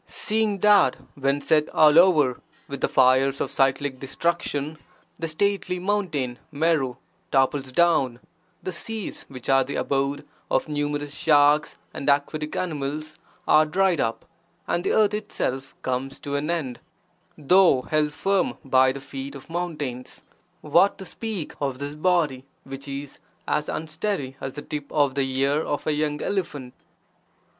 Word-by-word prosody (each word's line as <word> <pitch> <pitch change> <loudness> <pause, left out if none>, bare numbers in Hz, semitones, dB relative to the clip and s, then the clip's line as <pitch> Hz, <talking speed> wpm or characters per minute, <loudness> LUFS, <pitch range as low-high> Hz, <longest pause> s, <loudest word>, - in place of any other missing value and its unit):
Seeing 215 -2 0
that, 205 -10 +5 0.2
when 140 +1 0
set 155 0 +2
all 155 +1 +7
over 155 -9 +4 0.3
with 140 -1 -6
the - - +2
fires 130 +1 +3
of - - -2
cyclic 135 0 +1
destruction 150 +1 -2 0.4
the 165 - -2
stately 185 +2 0
mountain 175 -10 -1
Meru 150 -4 +1 0.3
topples 135 0 +1
down, 135 -6 +2 0.4
the 185 - -3
seas 215 +4 -5
which 130 -3 -9
are 135 0 +4
the 140 +2 -6
abode 140 +1 -1 0.2
of - - +1
numerous 145 -1 -2
sharks 150 0 +3 0.2
and 140 - -2
aquatic 150 +2 0
animals 155 -2 -4 0.3
are 155 +1 +6
dried 180 +2 +1
up, 115 - -2 0.4
and 175 - 0
the - - 0
earth 215 -1 +3
(itself) 135 -11 -3
comes 130 +1 -3
to 140 0 -4
an 145 +2 -2
end, 150 -8 -2 0.6
though 160 -3 +4
held 150 +1 0
firm 195 +5 0
by 130 0 +4
the 140 +1 -7
feet 135 0 -7
of 140 +4 -12
mountains, 150 -8 -4 0.4
what 170 +6 +3
to 190 - -8
speak 215 -5 -4
of 135 -3 -1
this 140 +2 -5
body, 155 -5 +1 0.2
which 135 +1 -9
is 140 0 -7 0.3
as 150 0 0
unsteady 155 -3 -3
as 135 - -4
the 145 - -7
tip 145 -1 -6
of 145 -3 +2
the 135 -1 -1
ear 140 +3 +2
of 145 - -3
a 155 - +1
young 150 0 -1
elephant! 150 -10 -3
145 Hz, 150 wpm, -24 LUFS, 135-170 Hz, 0.6 s, all